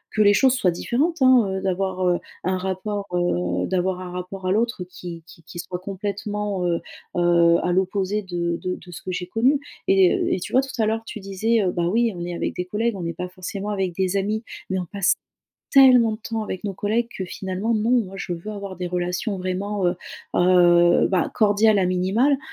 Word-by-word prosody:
que 215 - +3
les 205 - +6
choses 260 +4 +4
soient 190 -8 +2
différentes, 285 - -1
hein, 255 -5 +6
heu, 190 - -4
d'avoir, 190 -1 -1
heu, 175 -1 +2 0.2
un 185 +1 0
rapport, 190 +2 -3
heu, 90 - 0
d'avoir 185 0 -1
un 180 -1 -7
rapport 180 +1 -6
à - - +2
l'autre 230 -3 0
qui 175 -2 -9
qui 165 - -15
qui 175 - -10
soit 180 +1 -5
complètement, 200 0 -3
heu, 170 -1 0 0.4
heu, 170 -1 +4
à 180 - +1
l'opposé 190 +2 0
de 170 -2 -2
de 180 0 -1
de 175 - -13
ce 160 - -9
que 185 - -4
j'ai 180 0 -4
connu 250 +9 +2 0.3
et 190 -2 +5
heu, - - -1
et - - -1
tu - - -6
vois, 260 - +5
tout 265 -4 -4
à - - +3
l'heure, 225 +1 -1
tu 215 - -7
disais: 210 +4 0
«Heu, 185 - +1
bah, 170 -1 -1
oui, 230 +3 +2
on 175 0 -5
est 175 - -4
avec - - -2
des 180 - -3
collègues, 220 +4 -1
on 175 - -5
n'est 170 - -3
pas 180 +2 -5
forcément 195 +2 -6
avec 190 -4 -1
des 190 +1 0
amis». 215 +3 -1 0.3
Mais, 190 - 0
on 180 - -3
passe 200 +2 +1 0.6
tellement 250 -5 +7
de 215 - -6
temps 225 0 -3
avec 185 -3 -5
nos 200 - -3
collègues 220 +5 0
que, 190 - -2
finalement, 190 +5 -3
non, 215 +2 0
moi, 215 -6 +1
je 180 - -4
veux 175 +5 -6
avoir 200 -2 -6
des 180 -1 -3
relations 180 +3 -2
vraiment, 185 +2 -2
heu, 175 - +1 0.4
heu, 175 -1 +5
ben, 185 -3 +1
cordiales 210 0 +4
à 185 - +2
minimal, 195 +10 +2
190 Hz, 220 wpm, -23 LUFS, 180-215 Hz, 0.6 s, tellement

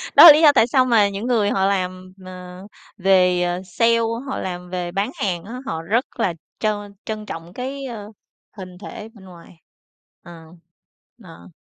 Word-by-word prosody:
Đó - - +10
là 325 - +13
lý 305 - +2
do 300 -2 +8
tại 225 - +5
sao 255 0 +3
mà 220 -5 +3
những 200 +5 -5
người 220 -5 +2
họ 195 -1 +1
làm, 185 -1 -2
ờ, 180 0 -10 0.3
về, 180 -2 +3
ờ, 175 +1 -2
sale, 230 +5 +2 0.3
họ - - -3
làm 180 -1 -6
về 180 -1 -4
bán 200 +6 -2
hàng 175 -4 -3
á, 240 +5 -8
họ 160 -7 -4
rất 225 +10 0
là 190 -6 +1 0.3
trân 205 -2 -2
trân 215 -1 -5
trọng 165 -2 -8
cái, 270 +2 -6
ơ, 215 -4 -8 0.5
hình 180 -1 -10
thể 210 +2 -9
bên 200 -4 -16
ngoài. 170 -2 -16 0.6
Ờ. 165 -2 -13 0.8
Ờ. 165 +1 -14
195 Hz, 180 wpm, -21 LUFS, 180-225 Hz, 0.8 s, là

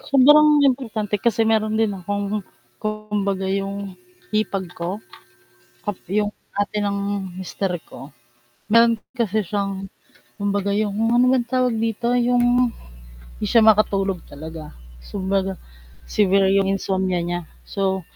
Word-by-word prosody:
Sobrang 295 +2 +6
importante 220 -6 0
kasi 225 -1 +2
meron 220 -1 +1
din 220 -2 +2
akong, 200 +2 -3 0.4
kumbaga 210 -2 -2
'yong 195 0 -3 0.4
hipag 200 -3 0
ko? 170 +1 -4 0.9
Tap 205 -2 -2 0.2
'yong 210 0 +1 0.3
ate 205 +1 -1
ng 200 0 -1 0.4
mister 190 0 -3 0.2
ko, 140 - -11 0.6
meron 230 +1 +6 0.2
kasi 220 -2 +1
siyang, 195 0 -3 0.5
kumbaga 200 0 -1
'yong 205 -1 0 0.2
ano 245 - +5
ba 260 - +4
'yon 240 - -1
tawag 250 -2 +2
dito? 225 +1 -2
'Yong 245 0 +3 0.9
hindi - - -4
siya 230 - +5
makatulog 195 -3 +3
talaga. 155 +1 -8 0.3
Kumbaga, 195 0 -1 0.6
severe 195 -1 +3
yung 195 - +3
insomnia 190 -2 0
niya 175 +1 -2 0.2
so 190 -1 -1
205 Hz, 120 wpm, -22 LUFS, 195-220 Hz, 0.9 s, Sobrang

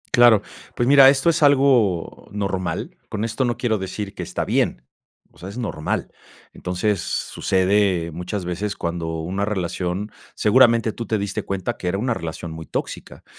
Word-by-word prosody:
Claro, 120 -4 +6 0.3
pues, 120 - 0
mira, 135 -1 +8
esto 135 +4 +3
es 165 -1 +2
algo 130 - +3
normal, 100 -3 -3
con 105 +1 -2
esto 115 +3 -1
no 120 -2 0
quiero 120 -3 0
decir 100 +1 -5
que - - -5
está - - -3
bien, - - 0 0.5
o - - -23
sea, 90 - -8
es 100 - -9
normal. 105 -10 -3 0.4
Entonces, 90 +2 -1
sucede 95 -2 +1
muchas 90 +3 -4
veces 95 +4 -3
cuando 85 -1 -3
una 95 +5 -2
relación 95 0 -2 0.2
seguramente 115 -1 +4
tú 115 - -5
te 110 - 0
diste 100 -1 -3
cuenta 95 -2 -3
que 90 - -3
era 95 - -1
una 120 +4 0
relación 85 -3 -6
muy 80 0 -8
tóxica. - - -6
100 Hz, 165 wpm, -22 LUFS, 90-115 Hz, 0.5 s, mira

